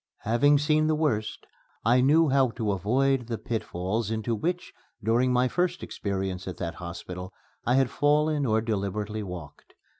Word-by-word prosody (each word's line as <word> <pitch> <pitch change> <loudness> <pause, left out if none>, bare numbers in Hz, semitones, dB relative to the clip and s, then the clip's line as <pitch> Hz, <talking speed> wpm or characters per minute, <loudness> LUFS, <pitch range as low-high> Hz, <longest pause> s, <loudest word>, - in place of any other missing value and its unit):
Having 120 +7 +4
seen 155 +1 +2
the 155 - +2
worst, 125 -9 -1 0.4
I 120 +3 +5
knew 155 +4 +4
how 135 -1 +3
to 115 -3 -2
avoid 125 +6 +1
the 115 -2 -3
pitfalls 110 -2 -3
into 110 +1 -1
which, 175 +11 -2 0.3
during 120 +4 +2
my 125 +1 +3
first 180 +5 -1
experience 95 -2 -3
at 95 - -5
that 85 -2 -3
hospital, 90 +1 -7 0.4
I 120 - +4
had 135 -2 +3
fallen 150 0 +2
or 110 0 +2
deliberately 105 0 -2
walked. 90 -7 -9
115 Hz, 155 wpm, -27 LUFS, 100-140 Hz, 0.4 s, I